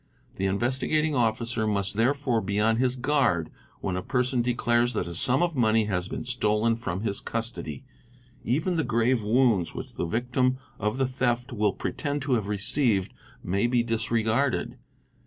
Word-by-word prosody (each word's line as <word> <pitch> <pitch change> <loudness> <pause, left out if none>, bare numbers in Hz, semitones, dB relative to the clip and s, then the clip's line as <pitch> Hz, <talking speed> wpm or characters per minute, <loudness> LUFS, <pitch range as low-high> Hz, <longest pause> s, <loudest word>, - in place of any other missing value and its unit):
The 95 - 0
Investigating 130 +9 0
Officer 115 -2 0
must 100 -2 0
therefore 125 0 +1
be 100 +1 -2
on 110 +1 +3
his 125 +1 +1
guard 125 - +1 0.3
when 95 - -2
a 90 - -2
person 125 +3 0
declares 120 0 +1
that - - -1
a 85 - -6
sum 125 - +3
of 170 -3 -1
money 110 -3 +3
has 90 -3 -2
been - - -5
stolen 115 -2 +1
from 95 -5 -4
his 105 -3 -2
custody, 115 +3 -4 0.6
even 160 +9 0
the 160 - +2
grave 120 0 +1
wounds 110 -5 +2
which - - -7
the 85 - -3
victim 125 +5 0 0.2
of 105 +4 -1
the 135 - +2
theft 125 0 -1
will 105 -3 +1
pretend 145 -1 -3
to 140 -2 0
have 110 -5 0
received 105 0 0 0.3
may 100 +6 +1
be 120 -1 +2
disregarded. 115 +3 0
120 Hz, 165 wpm, -26 LUFS, 105-130 Hz, 0.6 s, on